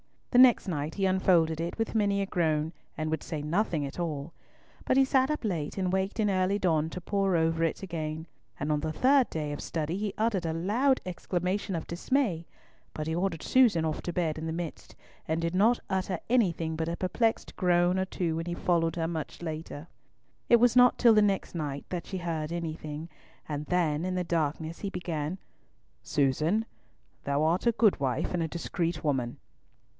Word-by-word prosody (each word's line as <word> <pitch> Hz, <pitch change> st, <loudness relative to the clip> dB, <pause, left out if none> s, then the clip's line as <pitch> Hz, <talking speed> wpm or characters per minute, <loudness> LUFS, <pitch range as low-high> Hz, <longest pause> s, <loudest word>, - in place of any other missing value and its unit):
The 245 Hz, -, +5 dB
next 250 Hz, -4 st, +6 dB
night 150 Hz, -3 st, -3 dB
he 195 Hz, -, 0 dB
unfolded 175 Hz, -4 st, +3 dB
it 170 Hz, +1 st, -4 dB
with 225 Hz, -1 st, -2 dB
many 200 Hz, -2 st, +2 dB
a -, -, -2 dB
groan, 160 Hz, -5 st, 0 dB, 0.3 s
and 155 Hz, 0 st, -2 dB
would 160 Hz, -, -1 dB
say 155 Hz, -2 st, -4 dB
nothing 165 Hz, -2 st, 0 dB
at 140 Hz, -, -7 dB
all; 155 Hz, -2 st, -3 dB, 0.5 s
but 255 Hz, -, +2 dB
he 270 Hz, -, +7 dB
sat 265 Hz, 0 st, +3 dB
up 300 Hz, -3 st, -2 dB
late 170 Hz, -8 st, -2 dB
and 185 Hz, -2 st, 0 dB
waked 190 Hz, +3 st, -1 dB
in 210 Hz, -1 st, +2 dB
early 190 Hz, +1 st, +1 dB
dawn 160 Hz, -5 st, +1 dB
to 180 Hz, -, -6 dB
pore 195 Hz, 0 st, 0 dB
over 165 Hz, 0 st, +1 dB
it 165 Hz, -, -3 dB
again, 160 Hz, -3 st, -4 dB, 0.3 s
and 150 Hz, +2 st, -1 dB
on 150 Hz, -, +2 dB
the 155 Hz, +1 st, -3 dB
third 265 Hz, -, +4 dB
day 150 Hz, -2 st, -3 dB
of 145 Hz, -, -5 dB
study 160 Hz, +2 st, -2 dB
he 205 Hz, -1 st, -2 dB
uttered 215 Hz, -5 st, 0 dB
a 160 Hz, -, -1 dB
loud 230 Hz, +11 st, +1 dB
exclamation 185 Hz, +2 st, -2 dB
of 165 Hz, -, -4 dB
dismay, 175 Hz, -, -1 dB, 0.5 s
but 155 Hz, -, -4 dB
he 160 Hz, -, -1 dB
ordered 175 Hz, -1 st, -1 dB
Susan 235 Hz, -11 st, +4 dB
off 155 Hz, -1 st, -2 dB
to 175 Hz, -, -3 dB
bed 160 Hz, -3 st, -1 dB
in 160 Hz, -, -4 dB
the 160 Hz, -, -2 dB
midst, 170 Hz, -1 st, -6 dB, 0.3 s
and 160 Hz, +1 st, 0 dB
did 165 Hz, +1 st, -1 dB
not 220 Hz, +6 st, +4 dB
utter 190 Hz, -1 st, -1 dB
anything 170 Hz, -9 st, +1 dB
but 160 Hz, +1 st, -2 dB
a 170 Hz, -, -2 dB
perplexed 225 Hz, +5 st, 0 dB
groan 180 Hz, 0 st, +2 dB
or 190 Hz, -, +1 dB
two 170 Hz, -4 st, -2 dB
when 165 Hz, -, -3 dB
he 175 Hz, 0 st, -3 dB
followed 165 Hz, -2 st, +1 dB
her 165 Hz, -1 st, -1 dB
much 160 Hz, -1 st, -5 dB
later. 160 Hz, -2 st, -6 dB, 0.6 s
It 235 Hz, -1 st, +6 dB
was 245 Hz, 0 st, +5 dB
not 250 Hz, 0 st, +6 dB
till 235 Hz, -2 st, +6 dB
the 215 Hz, -, +5 dB
next 200 Hz, -2 st, 0 dB
night 145 Hz, -4 st, -4 dB
that 180 Hz, -2 st, -4 dB
she 190 Hz, -, -4 dB
heard 165 Hz, -3 st, -3 dB
anything, 160 Hz, -1 st, -5 dB, 0.4 s
and 150 Hz, -1 st, -4 dB
then, 165 Hz, -3 st, +1 dB
in 185 Hz, 0 st, -2 dB
the 180 Hz, -, 0 dB
darkness, 160 Hz, -1 st, -2 dB
he 200 Hz, -, -3 dB
began, 170 Hz, -2 st, -3 dB, 0.6 s
"Susan, 155 Hz, +10 st, +1 dB, 0.6 s
thou 140 Hz, +2 st, +1 dB
art 170 Hz, +8 st, +1 dB
a 235 Hz, -, +4 dB
good 215 Hz, -6 st, +3 dB
wife 135 Hz, +3 st, -1 dB
and 175 Hz, -, 0 dB
a 165 Hz, -, 0 dB
discreet 170 Hz, 0 st, -3 dB
woman." 130 Hz, -5 st, -1 dB
170 Hz, 200 wpm, -29 LUFS, 160-195 Hz, 0.6 s, he